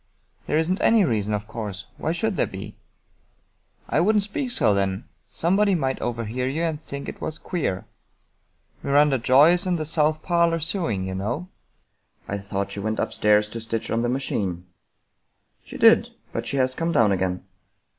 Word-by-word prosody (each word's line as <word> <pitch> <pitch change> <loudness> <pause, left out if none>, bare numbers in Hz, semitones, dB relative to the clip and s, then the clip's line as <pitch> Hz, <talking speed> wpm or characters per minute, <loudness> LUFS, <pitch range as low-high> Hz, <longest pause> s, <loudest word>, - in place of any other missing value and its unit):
" - - -38
There 150 - +1
isn't 170 +4 0
any 225 -4 +5
reason, 110 -6 0
of 105 0 -2
course. 105 -3 -6
Why 160 - -1
should 200 +5 0
there - - +1
be?" 95 +1 -8 0.6
" - - -41
I - - +1
wouldn't 210 +4 +3
speak 255 +6 -3
so, 175 - +3
then. 95 +1 -1 0.3
Somebody 195 +4 +2
might 135 -5 -1
overhear 120 +1 -2
you 150 +6 -1
and 160 -2 -2
think 140 0 -7
it - - -8
was 155 - -2
queer. 155 - -3 1.0
Miranda 140 -1 +3
Joy 135 +7 +6
is 180 +2 +1
in 180 - +1
the 155 -2 -2
south 155 0 +1
parlor 170 -1 +2
sewing, 160 - -1
you 95 - -4
know." 120 - -3 0.4
" - - -41
I 100 - -3
thought 100 0 -4
she 100 - -5
went 110 +2 -2
upstairs 105 0 +2
to 115 +1 -6
stitch 115 0 -3
on 115 - +1
the 120 - 0
machine." 100 -9 -2 0.5
" - - -47
She - - -9
did, - - +6 0.2
but - - -3
she 140 - -2
has 130 -1 +2
come 165 +4 -1
down 115 -9 +4
again." 95 -1 -1
130 Hz, 185 wpm, -24 LUFS, 105-165 Hz, 1.0 s, Joy